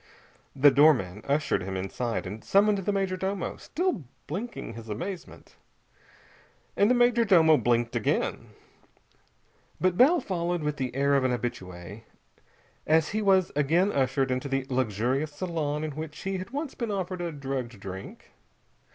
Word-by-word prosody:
The 140 +1 +6
doorman 130 - +4
ushered 145 +2 +1
him 95 +1 -4
inside 95 +2 -3
and 105 +4 -7
summoned 205 +1 +3
the 195 +2 -1
major 195 -2 0
domo, 190 0 -3
still 350 - -2 0.2
blinking 195 - -5
his 115 -1 -10
amazement. 175 - -7 1.2
And 205 - +4
the 250 - +4
major 240 -1 +4
domo 165 -7 +6
blinked 120 -1 +1
again. 115 - -1 1.3
But 185 -1 +1
Bell 310 +8 +6
followed 175 - -2
with 150 -1 -2
the 130 -2 -3
air 140 +1 +2
of 140 -1 +3
an 130 - +2
habitué, 100 -5 -5 0.9
as 160 -1 +3
he 215 +1 -1
was 190 -3 +3
again 165 +7 +2
ushered 135 -2 +1
into 130 +2 -2
the 135 -1 -1
luxurious 130 +5 0
salon 155 -3 -2
in 155 - -3
which 155 +1 -7
he 195 0 -2
had 185 - -7
once 285 +2 -4
been 235 -3 -4
offered 185 -3 -3
a 170 -1 -2
drugged 135 -6 -5
drink. 95 0 -9
150 Hz, 150 wpm, -27 LUFS, 125-190 Hz, 1.3 s, The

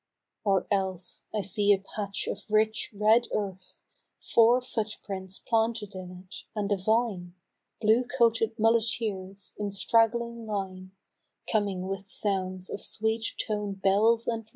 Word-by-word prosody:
Or 195 -3 +2
else, 190 -2 0
I 215 - -1
see 200 +1 +2
a 200 - +6
patch 200 +1 -4
of - - -6
rich 215 +1 +2
red 215 +3 +3
earth, 190 -3 -5 0.4
Four 235 +2 +4
foot 220 -4 -4
prints 190 -1 -5
planted 225 -2 -1
in 185 -1 -7 0.2
it, - - -9
and 205 -1 -2
a - - +4
vine, 195 -3 0 0.4
Blue 225 +3 +3
coated 230 -2 +1
muleteers, 215 -4 0
in 205 -1 -1
stragg'ling 230 +3 +1
line, 190 -3 -4 0.6
Coming 200 -4 0
with 195 0 -4
sounds 185 -2 -1
of - - -4
sweet 220 +1 +1
toned 205 -3 -3
bells 220 +4 +3
and 225 -1 -2
mirth. - - -28
210 Hz, 140 wpm, -28 LUFS, 195-225 Hz, 0.6 s, a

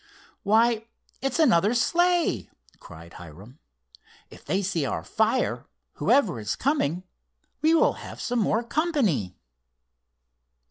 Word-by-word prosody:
"Why, 225 +2 +2 0.3
it's 270 +1 -1
another 235 - +3
sleigh!" 345 - +1 0.3
cried 85 +1 -13
Hiram. 90 - -13 0.7
"If - - -14
they 195 +1 -1
see 180 -5 -1
our 135 - -3
fire, - - -1 0.3
whoever 210 - +2
is 105 0 -3
coming, 185 - -1 0.6
we 320 +1 +4
will - - +3
have - - -10
some 245 0 -2
more 220 +2 +1
company." 235 - -1
220 Hz, 110 wpm, -25 LUFS, -, 0.7 s, we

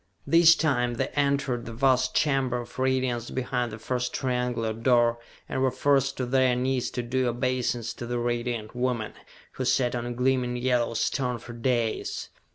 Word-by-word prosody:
This 165 +2 +7
time 125 -7 +1
they 135 +2 -1
entered 140 -4 0
the 115 - -6
vast 130 +1 +2
chamber 135 -4 +1
of 120 +2 -11
radiance 130 -2 0
behind 125 -2 -2
the 110 - -7
first 125 +2 -3
triangular 125 -3 -1
door, 120 0 +2 0.3
and 130 - -2
were 130 - +3
forced 135 0 +1
to 130 - -1
their 130 0 +3
knees 130 0 0
to 120 - 0
do 125 +1 0
obeisance 120 -2 -1
to 120 - -7
the 120 0 -2
Radiant 120 -2 -2
Woman, 125 -3 -1 0.4
who 130 - -4
sat 125 -1 +2
on 120 -1 -3
a - - -3
gleaming 125 0 0
yellow 120 -2 0
stone 125 +1 0
for 120 +1 -10
dais! 120 -2 -1
125 Hz, 170 wpm, -26 LUFS, 120-130 Hz, 0.4 s, This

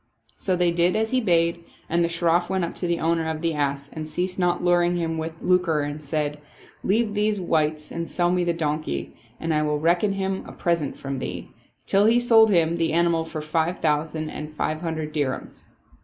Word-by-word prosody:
So 185 - 0
they 175 -1 +3
did 170 +1 +2
as 220 0 0
he 255 0 +2
bade 170 -4 +2 0.2
and 170 +1 +1
the 170 - +1
Shroff 170 +1 +1
went 190 -1 0
up - - -6
to 180 - -2
the 170 0 0
owner 165 0 +1
of 160 -1 -3
the 165 -1 0
ass 140 -1 -1
and 155 -1 -5
ceased 180 +4 -2
not 175 -1 +1
luring 175 0 +3
him 165 -1 -2
with 160 +1 -6
lucre 180 -4 +2
and 145 +1 -4
saying, 150 0 -2 0.3
" - - -25
Leave 215 +2 +1
these 210 0 +1
wights 155 -3 0
and 170 0 -4
sell 175 -1 +1
me 180 0 +1
the 175 - +1
donkey, 150 - -3 0.2
and 165 0 -1
I 150 - +2
will 150 0 0
reckon 175 +6 +2
him 190 -1 -2
a - - -9
present 170 -5 -1
from 135 -1 -4
thee," - - -6 0.3
till 200 +1 +3
he 235 +2 +5
sold 225 -2 +6
him 170 -3 +3
the 165 -1 0
animal 170 -1 +2
for 160 -1 -5
five 160 +3 0
thousand 155 0 -1
and 150 0 -6
five 155 +1 -2
hundred 160 -2 -3
dir 145 -4 0
hams. - - -13
170 Hz, 215 wpm, -24 LUFS, 155-180 Hz, 0.3 s, sold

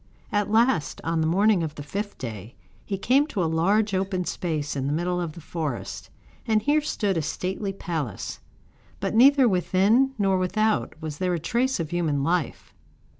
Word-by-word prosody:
At 205 -1 0
last, 220 - +2
on 165 0 0
the 160 - +1
morning 195 +3 +3
of 155 -2 -4
the 145 - -7
fifth 200 +7 -5
day, 110 -2 -7 0.3
he 195 - -3
came 265 +9 +3
to 200 - -1
a - - +1
large 195 +6 +2
open 190 -1 -1
space 155 -6 -2
in 135 -1 -2
the 145 - 0
middle 180 +2 -1
of 165 -3 -4
the 170 - -11
forest, 155 -6 -5 0.4
and 220 -1 +3
here 290 +7 +2
stood 205 - -1
a - - +1
stately 185 +6 -3
palace; 160 - -4 0.6
but - - -2
neither 265 +3 +6
within 210 +7 +2
nor 195 -3 +2
without 215 -1 0
was 150 -2 -5
there 180 -1 +1
a - - -3
trace 240 - 0
of 160 -1 -3
human 155 -5 0
life. 170 0 -2
180 Hz, 180 wpm, -25 LUFS, 160-215 Hz, 0.6 s, neither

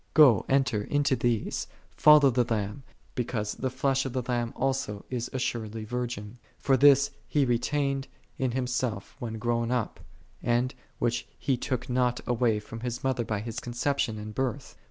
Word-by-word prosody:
Go 135 -11 +7
(enter) 135 -6 +2
into 145 +2 +1
these, 115 -2 -1 0.3
follow 150 -3 +7
the 120 -1 +1
Lamb, 105 +3 -1 0.3
because 115 -4 -2
the 130 - -2
Flesh 135 +1 +1
of 130 - -4
the 130 -1 -1
Lamb 120 -1 -1
also 135 -6 -1
is 120 -1 -2
assuredly 115 -4 -3
vir 125 +2 -2
gin. 110 0 -8 0.2
For 135 - +2
this 140 +1 +6 0.2
He 145 -2 +2
retained 135 +3 0 0.3
in 130 -2 0
Himself 125 -5 -2
when 115 -4 -4
grown 115 0 0
up, 125 -3 -1 1.0
which 120 0 -1
He 135 - +1
took 125 0 -3
not 125 -1 +1
away 120 -3 +2
from 110 +2 -9
His 120 +1 -4
Mother 130 -2 +1
by 105 -2 -2
His 115 +1 -5
conception 120 -1 -1
and 105 0 -7
birth. 130 +2 -3
125 Hz, 160 wpm, -28 LUFS, 115-135 Hz, 1.0 s, Go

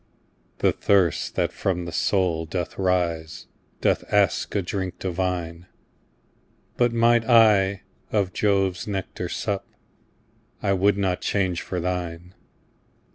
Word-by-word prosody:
The - - +3
thirst 95 -5 +1
that - - 0
from 90 -2 -2
the 85 - -6
soul 85 -2 0
doth 90 +2 -4
rise, 85 -4 -1 0.4
Doth - - +2
ask 100 -5 +2
a 100 - +1
drink 95 0 -4
divine: 90 -2 -3 1.1
But 120 -1 +2
might 115 0 +3
I 105 -5 +4 0.3
of 100 -4 0
Jove's 95 -3 +1
nectar 95 -3 -4
sup, 100 +1 -3 0.9
I 100 - +1
would 100 +1 +2
not 95 -2 0
change 95 -4 0
for 90 - -4
thine. 90 0 -4
95 Hz, 120 wpm, -24 LUFS, 90-100 Hz, 1.1 s, I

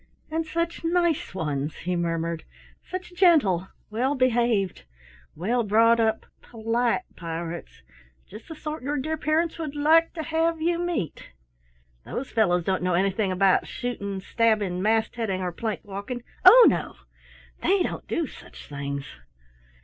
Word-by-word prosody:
"And 320 0 -1
such 335 +2 -2
nice 340 - +1
ones," 150 -4 -2
he 180 +1 -3
murmured. 165 -1 -2 0.4
"Such 365 -1 -7
gentle, 290 - +4 0.2
well 255 +6 0
behaved, 235 - +1 0.5
well 225 +10 0
brought 225 +2 +4
up, 220 -1 +1 0.2
polite 235 +7 -1
pirates! 170 0 -6 0.4
Just 215 +3 -12
the 320 - -8
sort 305 +1 -5
your 285 +3 -2
dear 310 +4 -2
parents 315 +2 0
would 305 -3 -4
like 320 +3 +4
to 320 - -4
have 325 +1 0
you 340 +1 0
meet. 345 - -3 0.7
Those 265 - -5
fellows 180 -6 +2
don't 190 +1 0
know 180 -1 +1
anything 195 +2 +1
about 190 0 +3
shooting, 200 -6 -4
stabbing, 210 -4 +1
mast 220 +3 +1
heading 195 -5 -2
or 180 - -2
plank 215 +3 -4
walking; 205 +5 -6 0.2
oh, - - +10
no! - - 0 0.7
They 390 -1 +3
don't - - -5
do 335 - -1
such - - -13
things." 140 -1 -5
230 Hz, 140 wpm, -25 LUFS, 185-315 Hz, 0.7 s, oh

